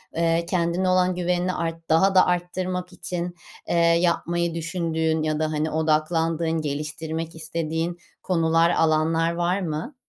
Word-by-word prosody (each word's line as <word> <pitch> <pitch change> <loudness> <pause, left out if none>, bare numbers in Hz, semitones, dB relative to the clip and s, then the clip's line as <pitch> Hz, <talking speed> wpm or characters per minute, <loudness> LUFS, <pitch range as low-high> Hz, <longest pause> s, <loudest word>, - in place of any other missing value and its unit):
eee, 165 0 +1
kendine 180 +1 +1
olan 185 0 +3
güvenini 180 +1 0
art 165 -1 -4
daha 190 +5 +4
da 185 - +7
arttırmak 180 +1 -2
için, 175 -1 -4 0.3
eee, - - 0
yapmayı 170 0 +2
düşündüğün 160 -1 -1
ya 155 -1 -1
da, 155 0 0
hani, 155 +1 -1
odaklandığın, 160 +1 +1
geliştirmek 155 +2 -4
istediğin 165 +1 -3 0.3
konular, 165 -2 +3
alanlar 165 0 +2
var 175 +3 0
mı? 165 - -4
165 Hz, 130 wpm, -24 LUFS, 160-175 Hz, 0.3 s, da